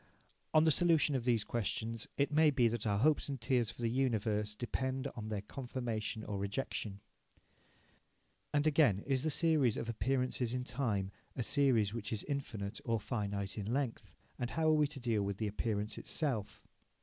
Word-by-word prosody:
On 155 - +6
the 160 - +5
solution 165 -2 +4
of 130 -3 -1
these 115 -4 +3
questions 115 0 -2
it 140 +1 +2
may 155 +1 +5
be 130 -5 +3
that 115 -1 -1
our 100 -1 +2
hopes 145 +6 +3
and 135 -2 -3
fears 120 -1 +1
for 120 +1 -7
the - - +3
universe 110 -4 0
depend 130 +3 -2
for 115 - -6
their 105 -2 -3
confirmation 120 -3 -4
or 105 -2 -4
rejection. 100 -1 -3 1.5
And, 145 0 +2
again, 140 - +4
is 135 -2 +1
the 155 - 0
series 155 -7 +3
of - - -3
appearances 125 0 0
in 125 - -1
time 115 -7 -1 0.2
a 125 - -1
series 120 -6 +3
which 110 -3 -5
is 110 -3 -1
infinite 115 -8 -4
or 115 -1 0
finite 100 -2 -3
in 105 +2 -3
length? 120 - -2 0.2
And 120 - -1
how 160 +2 +1
are - - +5
we 150 -1 +4
to 140 -1 -8
deal 115 -4 +1
with 100 -1 -2
the 110 - -1
appearance 105 0 -2
itself? 130 -10 -1
120 Hz, 180 wpm, -34 LUFS, 105-135 Hz, 1.5 s, On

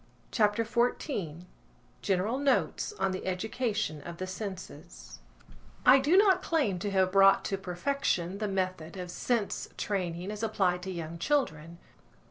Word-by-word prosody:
CHAPTER 210 0 +2
XIV 220 - -1 0.6
GENERAL 200 +6 0
NOTES 285 +8 +1
ON 195 - 0
THE 185 - -4
EDUCATION 205 - -2
OF 170 +3 -8
THE 185 - -3
SENSES 185 -4 -8 0.7
I 260 +2 +8
DO 300 +7 +3
not 385 -2 +5
claim 275 - 0
to 205 - -2
have 190 -1 +2
brought 195 0 +5
to 195 - -1
perfection 190 -1 -1
the 215 - -1
method 185 -3 -3
of 180 -1 -6
sense 225 +2 -1
training 180 -1 -2
as 210 0 -6
applied 190 -5 +1
to 190 +1 -5
young 170 -1 -6
children. 170 - -1
195 Hz, 140 wpm, -30 LUFS, 180-230 Hz, 0.7 s, I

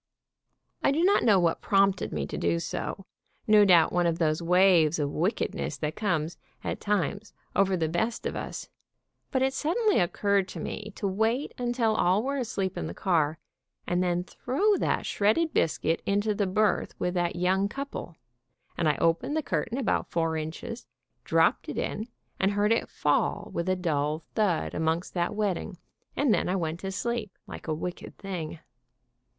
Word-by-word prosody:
I - - +3
do 315 +4 +1
not 395 +3 +4
know 210 -5 +5
what 170 -2 +1
prompted 195 -1 +2
me - - -2
to - - -6
do 170 - +1
so, 185 +3 -4 0.4
no 215 -1 +6
doubt 175 -4 +5
one 175 -1 +3
of 165 -1 0
those 155 -1 +1
waves 175 -2 +4
of 145 -2 -1
wickedness 185 +10 -1
that 155 0 -3
comes, 170 -6 -1 0.2
at - - -3
times, 205 +1 -1 0.2
over 195 -1 +3
the 160 -2 0
best 220 +9 -1
of - - -2
us, - - -5 0.6
but 260 -2 +1
it 265 0 +1
sud 305 - -1
denly 435 - +3
occurred 200 +2 +1
to - - -7
me 210 0 -5
to 200 - -2
wait 220 +8 0
until 240 -2 +1
all 190 +1 +2
were 280 +2 -1
asleep 195 -6 -2
in - - -3
the - - -7
car, 160 -5 +1 0.5
and 175 0 0
then 175 -1 +1
throw 290 - +1
that - - 0
shredded 220 +11 +1
biscuit 155 +2 +1
into 205 +2 +1
the 205 -1 0
berth 210 +3 +1
with 180 - -1
that 175 -2 0
young 190 +3 +1
couple, 275 -8 -6 0.6
and 165 -3 +3
I 150 - +1
opened 205 - +1
the 315 - 0
cur - - -1
tain 230 +2 -5
about 270 - 0
four 165 -1 0
inches, 160 +10 -5 0.4
dropped - - +2
it - - -5
in 220 - -2 0.3
and 195 +1 +2
heard 205 +1 +2
it 230 - +1
fall 145 -1 0
with 170 +2 -1
a 185 - +3
dull 155 -3 -1
thud 195 -7 +1
amongst 160 +2 -1
that 175 +2 -1
wedding, 205 -2 -2 0.4
and 275 -5 +3
then - - +1
I 185 - +1
went 165 -2 -2
to 195 +1 -4
sleep, 220 0 -3
like - - -9
a 155 - 0
wicked 175 +3 -6
thing. 175 -5 -5
190 Hz, 180 wpm, -28 LUFS, 170-220 Hz, 0.6 s, no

